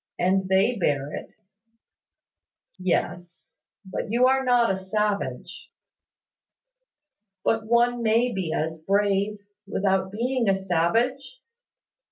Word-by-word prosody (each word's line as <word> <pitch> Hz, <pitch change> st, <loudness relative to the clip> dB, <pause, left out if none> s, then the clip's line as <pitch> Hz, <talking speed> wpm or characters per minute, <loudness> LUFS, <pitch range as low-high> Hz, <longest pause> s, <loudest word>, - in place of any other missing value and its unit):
And 190 Hz, +1 st, +1 dB
they 200 Hz, +6 st, +3 dB
bear 145 Hz, -4 st, 0 dB
it." -, -, -7 dB, 1.5 s
"Yes; 175 Hz, -1 st, -3 dB, 0.3 s
but 190 Hz, -, -5 dB
you 240 Hz, +3 st, +3 dB
are 265 Hz, +1 st, +3 dB
not 245 Hz, -4 st, +3 dB
a -, -, 0 dB
savage." 205 Hz, +2 st, -3 dB, 1.7 s
"But 225 Hz, -1 st, 0 dB
one 240 Hz, +1 st, +2 dB
may 230 Hz, +2 st, +2 dB
be 185 Hz, -5 st, -3 dB
as 160 Hz, +1 st, -2 dB
brave, 200 Hz, +2 st, 0 dB, 0.3 s
without 190 Hz, -1 st, 0 dB
being 240 Hz, +1 st, 0 dB
a 195 Hz, -, +3 dB
savage. 225 Hz, -, 0 dB
200 Hz, 105 wpm, -25 LUFS, 190-235 Hz, 1.7 s, they